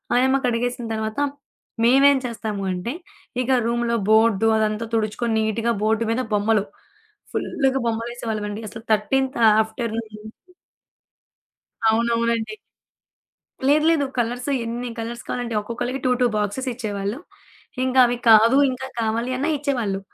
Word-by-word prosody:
ఆయమ్మ 265 +2 +3
కడిగేసిన 240 0 -1
తర్వాత, 220 +1 -3 0.7
మేవేం 275 +3 +6
చేస్తాము 215 -4 -4
అంటే 180 +7 -4 0.5
ఇక 250 - -3 0.2
రూములో 235 0 0
బోర్డు 220 -1 +4
అదంతా 215 +1 0
తుడుచుకొని 220 +1 -1
నీట్‌గా 225 +2 0
బోర్డ్ 220 +1 +2
మీద 250 +3 0
బొమ్మలు, 210 0 +2 0.7
ఫుల్లుగా 270 -1 0
బొమ్మలేసేవాళ్ళమండి 225 -2 -3
అసలు 225 +1 -10
13త్ 265 +5 +1 0.2
ఆఫ్టర్‌నూన్ 220 0 -4
నుంచి 215 +1 -11 1.6
అవునవునండి. 230 - +1 1.1
లేదు, 300 +2 +4
లేదు. 300 -4 +2
కలర్స్ 245 +3 -1 0.2
ఎన్ని 240 +2 -4
కలర్స్ 235 +1 -5
కావాలంటే 240 -2 -3
ఒక్కొక్కళ్ళకి 245 +4 -4
2, 255 - +2
2 250 - +4
బాక్స్‌స్ 210 +6 -2
ఇచ్చేవాళ్ళు. 205 0 -4 0.7
ఇంక 260 0 -1
అవి 240 0 -1
కాదు 225 +4 +7
ఇంకా 255 +1 -5
కావాలి 230 +3 -1
అన్నా 285 +5 -1
ఇచ్చేవాళ్ళు. 240 -9 -1
230 Hz, 120 wpm, -22 LUFS, 220-245 Hz, 1.6 s, కాదు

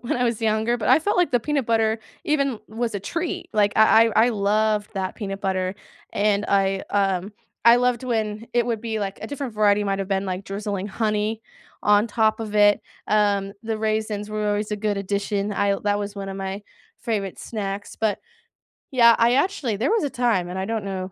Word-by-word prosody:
when 240 - -1
I 245 - +1
was 235 -2 -1
younger, 220 +2 +1
but 230 - -3
I - - +7
felt 405 +6 -1
like 355 -1 +3
the 245 - +2
peanut 285 -1 -1
butter 225 -1 +2 0.3
even 275 -5 0
was 225 0 -3
a 200 - -2
treat, 335 - -4
like, 205 -1 +3
I 220 +1 +6
I 225 +1 +4
I - - +2
loved 210 0 +1
that 190 -1 -3
peanut 195 -3 -5
butter, 185 -1 -1 0.4
and 205 0 +1
I, 195 -1 +2
um, 195 -1 0 0.3
I 235 +1 +8
loved 250 -1 +1
when 220 -2 -2
it 240 -1 +2
would 230 -3 -1
be 225 -1 -3
like, 200 -1 -4
a - - -4
different 280 -5 -5
variety 210 -1 +3
might've 195 -1 -2
been 195 0 0
like 185 +1 -4
drizzling 200 0 -4
honey, 215 +1 -1 0.4
on 210 +2 +4
top 220 0 +1
of 215 -1 -5
it, 205 -1 +5 0.3
um, 200 -2 +2
the 220 -1 -2
raisins 215 -1 -2
were 215 0 -2
always 205 +1 -1
a 210 - -1
good 210 -1 -1
addition, 200 +1 -2
l 200 0 +1
that 205 0 0
was 205 0 -4
one 195 -1 -6
of 195 - -5
my 195 +1 -4 0.4
favorite 200 -5 -3
snacks, 205 -2 -5
but, 220 -2 0 0.7
yeah, 235 -3 +6
I 235 +1 +4
actually, 275 - 0
there 240 - 0
was 450 -5 +2
a 290 - 0
time, 235 -9 0
and 185 +1 -4
I 190 - -2
don't 220 0 -2
know 190 -1 -4
210 Hz, 205 wpm, -23 LUFS, 200-230 Hz, 0.7 s, I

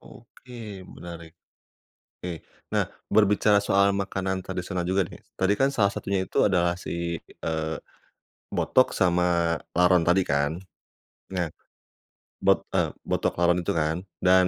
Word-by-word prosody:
Oke, 115 -4 -11 0.2
menarik. 85 -1 -10 0.8
Oke, 85 -2 -6 0.3
nah - - +3 0.3
berbicara 105 0 +4
soal 100 0 +3
makanan 95 -1 -2
tradisional 90 -1 -3
juga 95 0 +2
nih, - - -12 0.2
tadi 95 +1 +3
kan 135 - +5
salah 100 -7 +2
satunya 95 -1 -1
itu - - +1
adalah 90 -2 +2
si, 90 - -8 0.6
eee, 80 0 -1 0.8
botok 130 - +3
sama 85 -2 +2 0.2
laron 90 0 +5
tadi 90 +3 +4
kan. 70 +1 +2 0.8
Nah, 85 -2 0 1.0
bot - - +5
eee, - - +2 0.2
botok - - +1
laron 85 0 +4
itu - - 0
kan, 80 0 +1 0.2
dan 90 0 +5
90 Hz, 130 wpm, -26 LUFS, 85-100 Hz, 1.0 s, kan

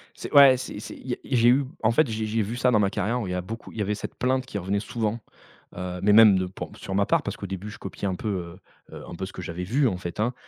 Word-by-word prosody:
C'est, - - -8
ouais 140 -2 +8
c'est 125 -4 -6
c'est - - -8
il - - -14
y 125 - 0
a - - -15
j'ai 120 -3 +3
eu 135 +2 +4 0.2
en 110 - +4
fait, 125 +4 +3
j'ai 110 0 -2
j'ai 110 +1 0
vu 110 +4 -4
ça 125 0 +3
dans 110 - +4
ma 100 -1 +2
carrière, 120 +5 -1
où 105 - -3
il - - -4
y 90 - -2
a 90 - -1
beaucoup 110 +6 -8
il - - -10
y 105 - +1
avait 105 +1 -1
cette 105 - -7
plainte 130 +1 0
qui 105 - -4
revenait 100 +2 -1
souvent, 115 0 -2 0.6
heu, 90 0 -5
mais 105 +1 +4
même 105 -3 +8
de 95 - -1
pour 95 - -8
sur 95 - -6
ma 100 0 +2
part, - - +2
parce - - -4
qu'au 100 - -6
début, 95 +2 -6
je - - -11
copiais 100 +1 -5
un 95 - -1
peu, 110 - -5
heu 90 -3 -4 0.4
heu, - - -9
un - - -8
peu 95 +2 -4
ce 95 - -10
que 90 - -8
j'avais 85 +1 -5
vu, 130 +8 +2
en 95 - -2
fait 90 +3 -6
hein. 120 +3 0
105 Hz, 325 wpm, -25 LUFS, 95-120 Hz, 0.6 s, ouais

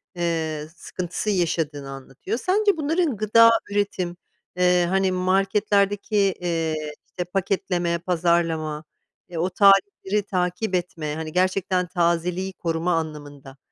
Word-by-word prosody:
eee, 160 -3 -2
sıkıntısı 185 +4 -4
yaşadığını 160 -7 -1
anlatıyor. 135 - -6
Sence 400 - +2
bunların 310 - 0
gıda 225 +2 +6 0.2
üretim, 195 -4 -1 0.4
eee, 180 -1 +4
hani, 190 0 +2
marketlerdeki, 195 +2 +1
eee, 175 -5 0 0.3
işte, 180 - -5
paketleme, 180 -2 -1
pazarlama, 165 -3 0 0.5
eee, 175 - -7
o 175 +3 0
tarihleri 200 +1 +3
takip 185 +1 -1
etme, 165 -4 -3
hani, 160 0 -5
gerçekten 185 0 +1
tazeliği 175 +2 0
koruma 165 0 -1
anlamında, 145 -4 -5
180 Hz, 110 wpm, -23 LUFS, 165-195 Hz, 0.5 s, gıda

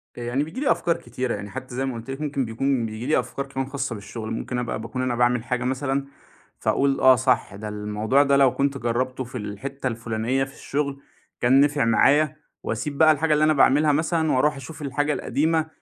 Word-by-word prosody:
يعني 120 +4 -1
بييجي 160 +11 -7
لي 290 - +3
أفكار 170 - +1
كتيرة، 120 +1 -3
يعني 100 - -7
حتى 125 +5 -7
زي 135 +1 -1
ما 130 - -2
قُلت 115 +3 -8
لِك 135 +3 -6
ممكن 140 -3 -1
بيكون 120 +2 0
بييجي 110 +2 -6
لي 155 - +3
أفكار 125 +3 -4
كمان 135 -1 -4
خاصة 135 -3 -3
بالشغل، 110 +2 -7
ممكن 125 +2 -3
أبقى 120 -2 -3
باكون 115 +3 -4
أنا 125 -1 0
باعمل 120 -1 +2
حاجة 125 0 -2
مثلًا، 135 +2 -1 0.5
فأقول 140 0 +1
آه 130 0 +7
صح 125 -5 +1
ده 105 +2 -6
الموضوع 105 +6 +1
ده 140 -1 +3
لو 135 -2 +5
كنت 140 0 0
جربته 125 +2 -1
في 125 +1 -8
الحتة 125 +6 -5
الفلانية 115 +2 -1
في 135 - -7
الشغل 140 -1 -3 0.4
كان 130 +3 +5
نِفع 145 -2 +2
معايا، 145 +6 +4 0.3
وأسيب 140 +6 -3
بقى 155 0 +7
الحاجة 155 +1 +2
اللي 150 +1 +3
أنا 155 - +4
باعملها 145 +2 +4
مثلًا 160 +1 +1
وأروح 140 +3 +2
أشوف 135 +4 -9
الحاجة 145 +2 0
القديمة، 160 +2 0
130 Hz, 205 wpm, -24 LUFS, 120-140 Hz, 0.5 s, آه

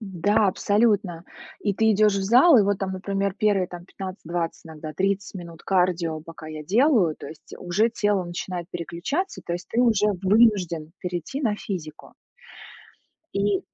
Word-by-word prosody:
М-да, 205 +2 +1
абсолютно. 200 -3 +1 0.4
И 205 -2 0
ты 220 +3 +3
идешь 210 0 +4
в 195 - -1
зал, 250 - +6
и - - +5
вот 200 -1 +1
там, 190 -1 -3
например, 195 +1 -2
первые 205 -3 +2
там 175 -1 -10
15-20, 175 -3 -5
иногда 155 -1 -8
30 195 +3 -1
минут 170 -3 -9
кардио, 175 -4 +1
пока 165 0 -11
я 155 -1 -7
делаю, 210 - +3
то - - -9
есть, 155 - -13
э, - - -7
уже 205 +6 +1
тело 205 -4 0
начинает 175 0 -5
переключаться, 175 - -3
то - - -4
есть 175 +1 -5
ты 235 - 0
уже 220 -4 +3 0.2
вынужден 190 -6 +3
перейти 180 - -4
на 215 -5 +1
физику. 160 -8 -7 1.2
И, 200 -1 +1
190 Hz, 160 wpm, -24 LUFS, 170-210 Hz, 1.2 s, зал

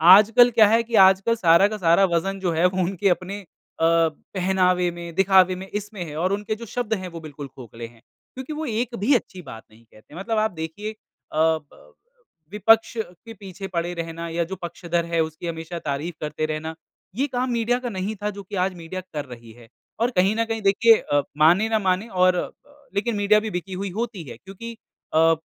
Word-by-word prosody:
आजकल 230 +4 +6
क्या 215 - +9
है 225 +2 +4
कि 230 0 -3
आजकल 195 +4 +2
सारा 180 -2 +5
का 215 - -5
सारा 180 +1 +4
वज़न 195 +3 -3
जो 185 -2 0
है 165 +2 +2
वो 185 0 +1
उनके 195 +2 0
अपने 185 +3 -2
अ, - - -18 0.4
पहनावे 180 +2 +1
में, 170 -1 -9
दिखावे 190 -1 +4
में 190 +1 -8
इसमें 210 -2 -5
है 150 -3 -8
और 185 +4 0
उनके 210 +1 -2
जो 230 - -9
शब्द 225 0 -3
हैं, 185 -3 -3
वो 170 -2 -8
बिल्कुल 145 -2 -8
खोखले 120 -3 -10
हैं, 115 -1 -21 0.3
क्योंकि 260 +4 -6
वो 310 +1 -4
एक 235 -1 -2
भी 235 +8 +3
अच्छी 190 -6 -3
बात 115 -8 -10
नहीं 110 +2 -20
कहते 110 +6 -18
मतलब 215 +5 -2
आप 215 0 +1
देखिए 170 +6 -6
अ, - - -15 0.4
ब 160 -1 +2
अ, - - -19 0.6
विपक्ष 225 +3 +3
के 220 +2 -7
पीछे 195 -2 -8
पड़े 170 +1 -1
रहना 165 0 -5
या 170 +1 -1
जो 190 - -2
पक्षधर 170 0 -2
है 165 - +2
उसकी 160 +2 -4
हमेशा 165 +1 -5
तारीफ़ 155 +3 -4
करते 150 0 -2
रहना, 155 +1 -4 0.4
ये 270 +5 0
काम 255 -1 -2
मीडिया 240 +1 +1
का 250 -1 -4
नहीं 195 +1 -3
था 210 - 0
जो 200 -1 -8
कि 200 +2 -8
आज 190 - -3
मीडिया 175 +2 -6
कर 150 -1 -3
रही 120 -3 -12
है। 115 - -15 0.3
और 240 +2 +1
कहीं 190 +4 +3
न 230 0 +1
कहीं 225 -1 -3
देखिए 215 +3 +5
अ, 145 0 0 0.2
मानें 190 +7 +4
न 215 - +1
मानें 190 +3 0
और 185 -2 +3
अ, - - -2 0.4
लेकिन 220 +3 0
मीडिया 205 +1 +4
भी 220 - -2
बिकी 190 +2 -11
हुई 200 - -3
होती 220 -8 -4
है 115 - -9
क्योंकि 220 - -10 0.4
अ, 165 +1 +5
185 Hz, 215 wpm, -23 LUFS, 165-215 Hz, 0.6 s, क्या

